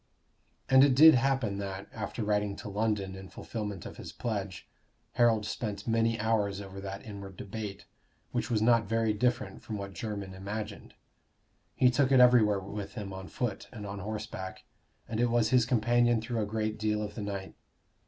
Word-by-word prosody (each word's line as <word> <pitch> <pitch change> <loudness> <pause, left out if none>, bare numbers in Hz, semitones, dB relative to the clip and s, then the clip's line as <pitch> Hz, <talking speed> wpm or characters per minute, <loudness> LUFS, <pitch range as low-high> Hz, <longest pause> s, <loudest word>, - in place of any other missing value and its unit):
And 130 0 +7
it 140 -2 +5
did 160 +4 +10
happen 130 -6 +1
that, 100 0 -5
after 110 +1 -4
writing 105 -1 0
to 105 - -7
London 105 -2 -1
in 95 -1 -9
fulfillment 105 -5 -5
of - - -8
his - - -8
pledge, 100 -6 -4 0.4
Harold 115 -3 +3
spent 105 -2 -4
many 115 0 +2
hours 105 -3 +1
over 95 -1 -8
that 100 0 -6
inward 100 -3 -8
debate, 105 -1 -6 0.5
which - - -2
was 110 -3 +1
not 115 -2 +4
very 115 -1 +2
different 125 +4 -1
from 110 - -5
what 100 -1 -6
Jermyn 100 0 -5
imagined. 105 +2 -6 0.8
He 125 -1 +5
took 135 +1 +2
it 130 - +6
everywhere 120 -5 +6
with 100 +1 -6
him 100 -3 -5
on 95 0 -7
foot 120 -6 -3
and 105 -3 -7
on 100 0 -5
horseback, 105 -2 -6 0.4
and 110 - -3
it 120 0 +3
was 115 -2 +2
his 125 -2 +4
companion 120 0 +3
through 115 0 -2
a 105 - -1
great 110 0 -2
deal 105 0 0
of 105 - -5
the 110 - -6
night. 100 -2 -5
105 Hz, 180 wpm, -30 LUFS, 100-115 Hz, 0.8 s, did